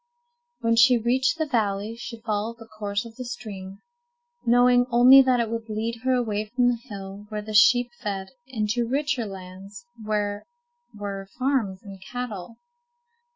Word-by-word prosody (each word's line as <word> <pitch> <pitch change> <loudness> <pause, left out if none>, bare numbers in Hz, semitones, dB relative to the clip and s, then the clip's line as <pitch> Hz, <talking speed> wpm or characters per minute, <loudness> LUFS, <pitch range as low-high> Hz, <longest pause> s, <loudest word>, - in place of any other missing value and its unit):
When 230 -1 +2
she 245 +1 +7
reached 255 +6 +1
the 315 - 0
valley 215 -4 -1
she 230 0 -8
followed 220 +1 -2
the 225 - -12
course 210 -1 -4
of 230 0 -12
the 255 - -5
stream, 200 -5 -8 0.7
knowing 245 +1 +5
only 250 +3 +8
that 255 -2 +3
it 235 - +1
would 230 -1 -4
lead 225 +2 -2
her 260 0 +2
away 215 -4 -1
from 245 +3 +2
the 240 -1 -1
hill 200 0 -8
where 210 -1 -4
the 215 0 -7
sheep 245 +4 +5
fed, 195 -2 -4 0.2
into 230 -1 -1
richer 260 -3 -1
lands 195 +3 -10 0.2
where 205 -1 -1 0.5
were 200 -2 -6
farms 250 -8 0
and 195 -2 -11
cattle. 225 -2 -6
225 Hz, 155 wpm, -25 LUFS, 205-245 Hz, 0.7 s, only